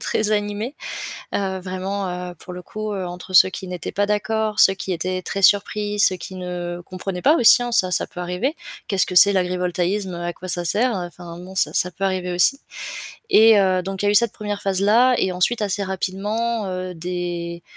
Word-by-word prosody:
très 215 Hz, -1 st, -1 dB
animée. 210 Hz, +5 st, -2 dB, 0.6 s
Heu, 190 Hz, -1 st, -2 dB
vraiment, 185 Hz, +1 st, -4 dB, 0.2 s
heu, -, -, -14 dB
pour 180 Hz, +2 st, -11 dB
le 180 Hz, -, -7 dB
coup, 215 Hz, +3 st, -6 dB
heu, 190 Hz, -2 st, -3 dB
entre 180 Hz, +1 st, -9 dB
ceux 185 Hz, 0 st, +7 dB
qui 190 Hz, 0 st, -7 dB
n'étaient 180 Hz, -2 st, -5 dB
pas 205 Hz, -, 0 dB
d'accord, 215 Hz, +1 st, -1 dB
ceux 195 Hz, -, +7 dB
qui 195 Hz, 0 st, -6 dB
étaient 185 Hz, +2 st, -3 dB
très 195 Hz, -, -4 dB
surpris, 205 Hz, +1 st, +2 dB
ceux 190 Hz, -, +4 dB
qui 190 Hz, -, -8 dB
ne 175 Hz, -1 st, -5 dB
comprenaient 185 Hz, 0 st, -6 dB
pas 300 Hz, +4 st, +5 dB
aussi, 245 Hz, -2 st, +6 dB
hein 240 Hz, -, -4 dB
ça, 185 Hz, -6 st, +2 dB
ça -, -, +1 dB
peut -, -, -11 dB
arriver. 180 Hz, -, -2 dB, 0.3 s
Qu'est-ce 195 Hz, -2 st, +1 dB
que 180 Hz, -, -6 dB
c'est 200 Hz, +3 st, +7 dB
l'agrivoltaïsme, 180 Hz, +1 st, -1 dB
heu, 170 Hz, -, -6 dB
à 175 Hz, 0 st, -3 dB
quoi 185 Hz, -, -10 dB
ça 175 Hz, -1 st, 0 dB
sert? 230 Hz, +7 st, +1 dB
Heu, 180 Hz, -2 st, -3 dB
enfin 175 Hz, -1 st, -11 dB
bon, 185 Hz, +2 st, -11 dB
ça -, -, +1 dB
ça 180 Hz, -, +1 dB
peut 185 Hz, +3 st, -7 dB
arriver 185 Hz, -2 st, -1 dB
aussi, 180 Hz, +11 st, +3 dB, 0.7 s
et 220 Hz, -, +7 dB
heu, 185 Hz, -1 st, +2 dB
donc 195 Hz, +1 st, -5 dB
il -, -, +1 dB
y -, -, +3 dB
a -, -, +4 dB
eu -, -, +1 dB
cette 230 Hz, +1 st, +4 dB
1re 205 Hz, -1 st, -5 dB
phase-là 205 Hz, +6 st, +3 dB
et 190 Hz, -, +1 dB
ensuite 200 Hz, +6 st, +1 dB
assez 205 Hz, 0 st, -1 dB
rapidement, 205 Hz, +4 st, -2 dB
heu, 185 Hz, 0 st, -5 dB
des 175 Hz, 0 st, -5 dB
190 Hz, 215 wpm, -21 LUFS, 180-210 Hz, 0.7 s, ceux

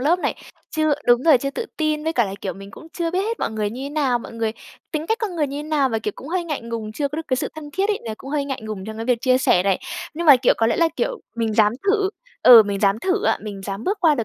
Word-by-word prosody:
lớp 320 Hz, +7 st, +3 dB
này, -, -, -1 dB, 0.4 s
chưa 310 Hz, -2 st, +1 dB
đúng 240 Hz, +1 st, +5 dB
rồi, 310 Hz, -6 st, +6 dB
chưa 275 Hz, +3 st, -3 dB
tự 455 Hz, +11 st, -4 dB
tin, 305 Hz, -1 st, 0 dB
với 320 Hz, -, 0 dB
cả 240 Hz, -6 st, +2 dB
là, 195 Hz, -, -5 dB
kiểu, 195 Hz, -, -3 dB
mình 195 Hz, +1 st, -11 dB
cũng 320 Hz, -, -12 dB
chưa 335 Hz, -2 st, -2 dB
biết 370 Hz, +2 st, 0 dB
hết 455 Hz, +2 st, -2 dB
mọi -, -, -1 dB
người 215 Hz, -2 st, -2 dB
như 255 Hz, +4 st, -7 dB
thế -, -, -4 dB
nào, 275 Hz, -5 st, +1 dB
mọi 230 Hz, -, -10 dB
người 225 Hz, -1 st, -2 dB, 0.4 s
tính 310 Hz, +1 st, -2 dB
cách 445 Hz, -, 0 dB
con 400 Hz, -6 st, -3 dB
người 300 Hz, -2 st, +1 dB
như 280 Hz, +1 st, -5 dB
thế -, -, -4 dB
nào, 290 Hz, -4 st, +2 dB
và, 225 Hz, -3 st, -1 dB
kiểu, 210 Hz, -2 st, -3 dB
cũng 275 Hz, -, -10 dB
hơi 350 Hz, +1 st, -1 dB
ngại 305 Hz, -4 st, -3 dB
ngùng, 230 Hz, -2 st, -5 dB
chưa 285 Hz, +4 st, -1 dB
có 295 Hz, -, -6 dB
được 325 Hz, -, -4 dB
cái 255 Hz, -, +1 dB
sự -, -, -2 dB
thân 300 Hz, -2 st, -9 dB
thiết 385 Hz, +6 st, 0 dB
ấy, 415 Hz, -, 0 dB
là 220 Hz, -2 st, -4 dB
cũng 270 Hz, -, -9 dB
hơi 290 Hz, -2 st, 0 dB
ngại 270 Hz, -4 st, -4 dB
ngùng 215 Hz, -3 st, -6 dB
trong 220 Hz, 0 st, -7 dB
cái 225 Hz, -, -4 dB
việc 245 Hz, -1 st, +2 dB
chia 255 Hz, -1 st, +3 dB
sẻ 185 Hz, -8 st, +3 dB
này. 195 Hz, -1 st, +1 dB, 0.4 s
Nhưng 340 Hz, +2 st, -3 dB
mà, 285 Hz, -4 st, +9 dB
kiểu, 245 Hz, -, +3 dB
có 225 Hz, -, +2 dB
lẽ 230 Hz, -, +1 dB
là, 335 Hz, -, +3 dB
kiểu, -, -, -2 dB, 0.2 s
mình 225 Hz, -2 st, 0 dB
dám 215 Hz, -1 st, +4 dB, 0.2 s
thử 405 Hz, -1 st, +2 dB, 0.3 s
ừ, 235 Hz, -3 st, +10 dB
mình 200 Hz, -1 st, -3 dB
dám 200 Hz, +1 st, +3 dB
thử 385 Hz, -, 0 dB
á, -, -, +2 dB
mình 205 Hz, -2 st, -7 dB
dám 195 Hz, +3 st, -5 dB
bước 400 Hz, +1 st, 0 dB
qua 320 Hz, -4 st, +5 dB
được 235 Hz, -5 st, -2 dB
270 Hz, 320 wpm, -22 LUFS, 220-320 Hz, 0.4 s, ừ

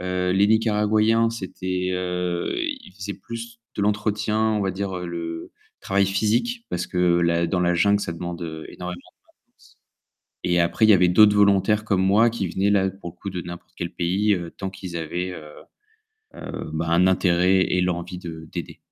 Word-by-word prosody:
heu, 90 Hz, 0 st, -1 dB
les 100 Hz, +2 st, +4 dB
Nicaraguayens, 110 Hz, +1 st, +3 dB
c'étaient, 95 Hz, -4 st, -3 dB
heu, 90 Hz, -1 st, -2 dB
ils 295 Hz, -, -4 dB
faisaient 100 Hz, 0 st, -5 dB
plus 115 Hz, 0 st, -9 dB, 0.2 s
de 100 Hz, -, -1 dB
l'entretien, 105 Hz, +1 st, 0 dB
on 110 Hz, -1 st, +2 dB
va 95 Hz, -1 st, 0 dB
dire 95 Hz, -1 st, -3 dB
le 85 Hz, -1 st, -6 dB, 0.3 s
travail 100 Hz, 0 st, +1 dB
physique 115 Hz, -, 0 dB
parce 90 Hz, 0 st, -2 dB
que 90 Hz, -1 st, +2 dB
la 85 Hz, 0 st, +2 dB
dans 90 Hz, +2 st, 0 dB
la 90 Hz, 0 st, +2 dB
jungle 100 Hz, +4 st, +3 dB
ça 85 Hz, -, -3 dB
demande, 85 Hz, +1 st, -6 dB
heu, 80 Hz, -1 st, -6 dB
énormément 90 Hz, 0 st, -6 dB
de -, -, -19 dB, 0.4 s
force. -, -, -24 dB, 0.7 s
Et 90 Hz, -1 st, +2 dB
après 85 Hz, +6 st, +3 dB
il -, -, +4 dB
y -, -, +9 dB
avait 90 Hz, -2 st, +5 dB
d'autres 105 Hz, +3 st, +6 dB
volontaires 100 Hz, +1 st, +3 dB
comme 100 Hz, -3 st, +1 dB
moi 105 Hz, +5 st, +4 dB
qui 105 Hz, -5 st, -2 dB
venaient 95 Hz, +4 st, +1 dB
là 95 Hz, -1 st, +3 dB
pour 95 Hz, -2 st, -9 dB
le -, -, -28 dB
coup 100 Hz, -, -4 dB
de 90 Hz, -2 st, -4 dB
n'importe 85 Hz, 0 st, -10 dB
quel 85 Hz, 0 st, -4 dB
pays, 95 Hz, +5 st, +1 dB
heu, 85 Hz, -3 st, -3 dB
tant 95 Hz, -, -3 dB
qu'ils 90 Hz, -3 st, -7 dB
avaient, 90 Hz, +3 st, -3 dB
heu 80 Hz, -4 st, -9 dB, 0.9 s
heu, -, -, -7 dB
bah, 80 Hz, +1 st, -2 dB
un 85 Hz, +2 st, +4 dB
intérêt 90 Hz, 0 st, +3 dB
et 90 Hz, -, +1 dB
l'envie 90 Hz, 0 st, -2 dB
de 80 Hz, -2 st, -8 dB
d'aider. -, -, -6 dB
95 Hz, 190 wpm, -23 LUFS, 90-105 Hz, 0.9 s, y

